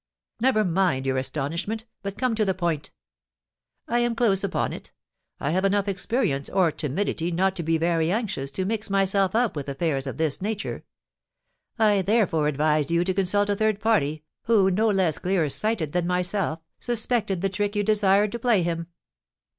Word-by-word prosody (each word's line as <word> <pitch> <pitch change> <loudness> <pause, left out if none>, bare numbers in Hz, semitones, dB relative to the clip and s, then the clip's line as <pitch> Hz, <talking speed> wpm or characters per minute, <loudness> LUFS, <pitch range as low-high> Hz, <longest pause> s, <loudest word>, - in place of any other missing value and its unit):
"Never 230 -3 +3
mind 175 -7 +1
your 130 -1 +1
astonishment, 165 - -3 0.2
but 200 0 -5
come 255 -2 0
to 220 -1 +1
the 190 -2 0
point." 170 -5 -2 1.0
"I 240 - +1
am 240 -1 +1
close 200 -5 +2
upon 200 - -1
it. - - -10 0.5
I 140 - -1
have 185 +3 +1
enough 200 +1 +1
experience 195 - -1
or 185 -4 +2
timidity 165 +3 -2
not 190 +3 +1
to - - -1
be 165 0 +1
very 165 0 +1
anxious 195 - -2
to 190 - -1
mix 220 +1 -2
myself 195 0 +1
up 235 -4 +1
with 145 -1 -4
affairs 140 -1 -1
of 135 - -5
this 160 +1 0
nature; 210 +1 -4 0.9
I 210 -3 +3
therefore 190 -7 +2
advised 150 0 +1
you 170 +1 +2
to 185 +1 0
consult 200 +2 +1
a - - +1
third 215 0 +1
party, 155 -9 +1 0.2
who, 205 -4 +4
no 215 +4 +2
less 190 -6 +1
clear 180 -4 +1
sighted 200 -3 0
than 175 0 0
myself, 180 -2 -1 0.2
suspected 220 -5 0
the 195 - +1
trick 205 +2 -2
you 205 - +1
desired 205 -1 +3
to 235 - -4
play 230 -6 +2
him." 170 0 -2
190 Hz, 180 wpm, -25 LUFS, 165-210 Hz, 1.0 s, who